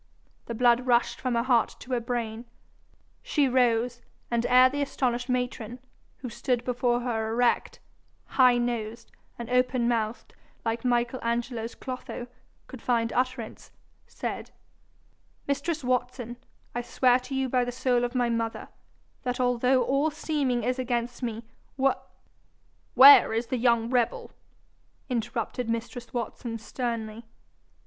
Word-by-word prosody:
The 235 - -4
blood 245 +1 +3
rushed 240 -1 +2
from 255 -2 -1
her 235 - +2
heart 245 -3 +2
to 260 - -11
her 250 - +2
brain. 235 -1 -3 0.8
She 310 - +1
rose, 240 -1 +2 0.3
and 235 0 +1
ere 255 +1 +7
the 285 +2 -3
astonished 250 -3 -1
matron, 245 -2 -2 0.4
who 260 - -4
stood 240 +1 -1
before 245 -1 0
her 225 -3 -1
erect, 240 +1 +1 0.5
high 250 -2 +4
nosed, 235 -1 -3 0.3
and 235 - -6
open 250 -1 +2
mouthed 230 -1 -2 0.3
like 225 0 -1
Michael 240 0 +1
Angelo's 235 0 -2
Clotho, 255 -1 -6 0.4
could 260 - -11
find 230 -2 0
utterance, 255 -3 -2 0.4
said, - - -5 1.0
'Mistress 285 +3 -1
Watson, 245 -1 -2 0.4
I 240 - -2
swear 250 +1 +3
to 255 +2 -7
you 265 0 0
by 250 0 +2
the 245 - -3
soul 245 0 +1
of 245 +1 -2
my 245 -1 +2
mother, 230 -1 -2 0.5
that 250 0 -3
although 250 +1 +3
all 275 +5 +1
seeming 290 -6 -1
is 250 +2 -1
against 240 -1 -2
me, 230 -2 -3 0.3
W 270 0 +3 0.5
' - - -40
'Where 275 -3 +9
is 230 +2 0
the 255 - -2
young 235 -1 +2
rebel?' 245 -2 0 0.8
interrupted 235 0 -2
mistress 235 +1 -4
Watson 235 -1 -4
sternly. 225 -1 -4
245 Hz, 140 wpm, -27 LUFS, 235-255 Hz, 1.0 s, Where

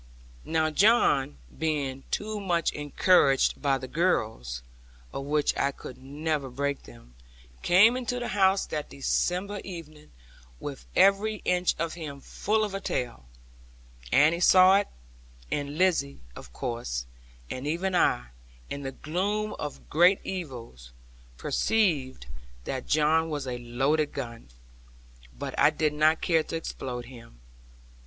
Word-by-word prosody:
Now 160 -1 +1
John, 150 - +3 0.2
being 140 -4 -2
too 215 0 -2
much 175 -4 0
encouraged 145 -1 +3
by 140 -2 +2
the 130 0 -7
girls 110 - -1 0.5
(of 135 - -4
which 150 +1 +1
I 140 - +1
could 130 -2 -10
never 145 +1 -3
break 140 +2 -2
them), - - -16 0.5
came 205 +7 +6
into 250 -1 -2
the 240 - -4
house 195 -1 +3
that 150 -1 -4
December 185 +8 -1
evening, 155 -5 -10 0.5
with 140 -2 -7
every 200 +3 +4
inch 180 0 +2
of 165 0 -2
him 150 -5 -7
full 215 +9 -1
of 210 -2 -3
a 195 - -3
tale. 120 - -3 0.8
Annie 155 +4 +4
saw 185 +2 +7
it, 205 - 0 0.6
and 145 0 -3
Lizzie, 160 - +1
of 65 - -11
course; 115 - -4 0.5
and 130 +3 -4
even 180 +5 -1
I, - - +2 0.4
in 140 - -4
the 135 -1 -5
gloom 200 +9 -2
of 150 - -6
great 175 +5 +5
evils, 120 - -7 0.5
perceived 150 - 0 0.4
that 130 - -4
John 155 +2 +3
was 145 -3 -3
a 125 -1 -4
loaded 135 +6 0
gun; 115 - -7 0.9
but - - -5
I - - +7
did 155 -1 0
not 155 +1 +3
care 165 -2 +3
to 160 - -6
explode 125 -6 -5
him. 115 - -14
150 Hz, 135 wpm, -27 LUFS, 130-180 Hz, 0.9 s, saw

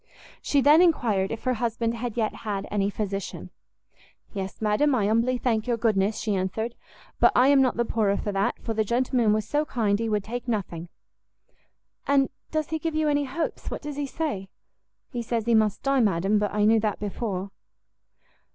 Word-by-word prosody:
She 285 - +2
then 300 +4 +6
enquired 225 - +2
if 225 - -5
her 255 - +1
husband 230 0 -1
had 235 0 -5
yet 220 -2 0
had 200 -3 -4
any 200 -1 +1
physician? 200 -1 -4 0.8
"Yes, 195 -2 -5
madam, 220 +7 +2
I 215 -5 +1
humbly 230 +4 +2
thank 225 -3 0
your 240 -1 +1
goodness," 215 -2 +1
she 215 - -1
answered; 195 +5 -2 0.5
"but - - +6
I 255 +2 +5
am 280 -1 +6
not 255 -4 +1
the 235 - +1
poorer 210 -3 +1
for 205 - -3
that, 195 0 0
for 225 - -2
the 220 0 +1
gentleman 240 0 +1
was 215 0 0
so 295 +1 +1
kind 215 -8 0
he 230 -1 -1
would 210 -2 0
take 245 +3 -6
nothing." 175 -7 -3 1.2
"And 275 -1 +3 0.2
does 310 -1 -2
he 320 - -1
give 320 0 -3
you 310 -1 +2
any 290 0 +1
hopes? 300 +5 -4
what - - -6
does 295 -1 -5
he 290 -1 -2
say?" 270 - -3 0.6
"He 245 -4 -3
says 230 -1 -2
he 235 - +2
must 215 -2 +2
die, 275 0 +2
madam, 200 -1 +2
but 205 0 -1
I 210 0 +1
knew 225 +1 +5
that 210 -2 -1
before." 200 -2 -4
225 Hz, 195 wpm, -26 LUFS, 205-255 Hz, 1.2 s, then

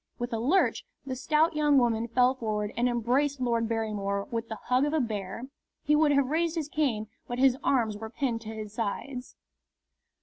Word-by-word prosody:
With 240 0 -4
a 225 - 0
lurch 300 +12 +2 0.2
the 260 -1 -3
stout 305 +5 +2
young 295 -2 +4
woman 235 -2 +2
fell 250 +2 +3
forward 215 -4 -3
and 245 +1 +2
embraced 255 +4 +1
Lord 235 -2 0
Barrymore 205 -3 -1
with 230 0 -2
the 220 - -4
hug 250 +1 +2
of 295 +1 0
a - - +3
bear. 215 -3 -3 0.4
He 300 - +3
would 300 -1 +4
have 280 -1 +3
raised 335 +1 +1
his 310 -3 -3
cane, 265 -9 0 0.2
but 245 - -4
his 260 -1 +5
arms 230 -6 +2
were 220 +1 -7
pinned 240 -2 -2
to 220 - -8
his 215 -2 -7
sides. 250 +4 -4
240 Hz, 195 wpm, -28 LUFS, 220-280 Hz, 0.4 s, his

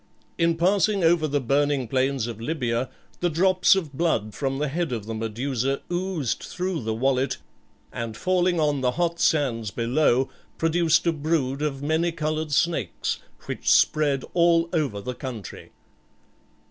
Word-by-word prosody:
In 165 -1 +2
passing 195 +2 +2
over 165 -1 +4
the 145 0 0
burning 140 0 +1
plains 130 0 0
of 115 -2 -6
Libya 125 -3 -1 0.3
the 175 - +1
drops 185 +3 +4
of 165 -7 -3
blood 130 -9 0
from 135 +3 -2
the 150 +2 -1
head 165 +2 -2
of 110 -4 -3
the 115 - -5
Medusa 120 +4 -2
oozed 175 -7 -1
through 180 -3 -3
the 110 -1 -2
wallet, 130 +2 +1 0.6
and 115 -2 -5
falling 180 -1 +1
on 150 -3 +1
the 125 -1 +1
hot 170 +1 -1
sands 120 -8 +1
below 125 +3 +2 0.3
produced 165 0 +2
a 170 - +4
brood 145 -3 -1
of 140 -2 -2
many 160 +3 +1
coloured 155 -1 -2
snakes, 145 - 0 0.3
which - - -3
spread 145 -3 +3
all 170 -1 +3
over 140 -12 -1
the 125 +4 -4
country. 120 -7 -8
145 Hz, 150 wpm, -25 LUFS, 125-170 Hz, 0.6 s, over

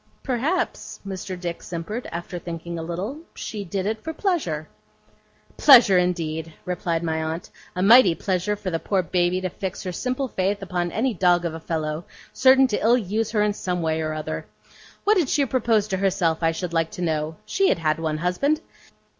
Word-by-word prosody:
'Perhaps,' 285 +8 -1
Mr. 190 -1 -5
Dick 175 -1 -4
simpered, 180 +8 -5
after 175 +1 -5
thinking 170 0 -6
a - - -3
little, 180 - -4 0.2
'she 210 -2 -5
did 190 +1 -3
it 220 +1 -2
for 320 - -4
pleasure.' 285 - -1 0.9
'Pleasure, 235 -10 +8
indeed!' 165 -3 -1
replied 170 -2 -1
my 160 -1 -1
aunt. 160 +2 -4 0.2
'A 180 - 0
mighty 205 -4 +7
pleasure 190 +3 -1
for 200 -2 -5
the 165 - -1
poor 190 +1 0
Baby 175 +2 +1
to 185 - -2
fix 190 0 -5
her 185 - -3
simple 255 +7 -2
faith 200 -2 -1
upon 175 -2 -2
any 245 +6 0
dog 175 -2 +3
of 165 - -2
a 165 - -6
fellow, 155 0 -3 0.3
certain 265 0 +6
to 240 -5 -1
ill 235 +3 +5
use 220 0 -1
her 210 -2 +2
in 210 0 +1
some 180 -3 -2
way 160 0 0
or 155 0 -2
other. 155 0 -4 0.6
What 420 +1 +4
did 320 -8 +1
she 285 - +2
propose 230 -5 +1
to 190 - 0
herself, 185 -4 +1
I 165 0 +3
should 170 +1 -4
like 165 -1 +1
to 180 - -4
know! 155 -1 -1
She 390 -1 +2
had - - +2
had 155 -1 0
one 155 -1 -1
husband. 180 - +1
180 Hz, 195 wpm, -24 LUFS, 165-220 Hz, 0.9 s, Pleasure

